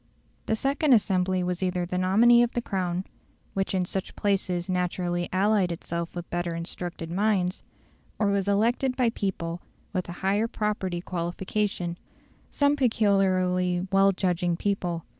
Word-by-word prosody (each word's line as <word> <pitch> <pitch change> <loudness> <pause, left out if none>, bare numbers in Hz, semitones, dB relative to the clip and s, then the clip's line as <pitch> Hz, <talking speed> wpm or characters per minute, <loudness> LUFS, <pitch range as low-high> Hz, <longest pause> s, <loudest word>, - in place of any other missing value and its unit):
The 220 - +2
second 275 +4 +2
assembly 185 -4 +2
was 180 0 -2
either 180 -1 0
the 180 +1 -2
nominee 225 +6 +5
of 240 0 +1
the 240 - -1
Crown, 185 -3 -2 0.5
which 195 0 -1
in 185 -1 +1
such 190 +1 -4
places 185 -3 0
naturally 180 -1 -1
allied 195 -1 +2
itself 170 0 -4
with 175 0 -5
better 175 -1 -2
instructed 170 0 -5
minds, 190 -1 +1 0.6
or 210 -2 +2
was 200 -1 0
elected 235 +6 +2
by 245 -3 +3
people 175 -5 -3 0.3
with 185 -3 -2
a 180 +2 -7
higher 205 +4 +2
property 205 -6 -2
qualification 175 +1 -2 0.5
some 285 0 +2
peculiarly 185 -7 +2
well 195 0 +5
judging 180 -2 0
people. 180 -4 -2
185 Hz, 140 wpm, -26 LUFS, 175-205 Hz, 0.6 s, nominee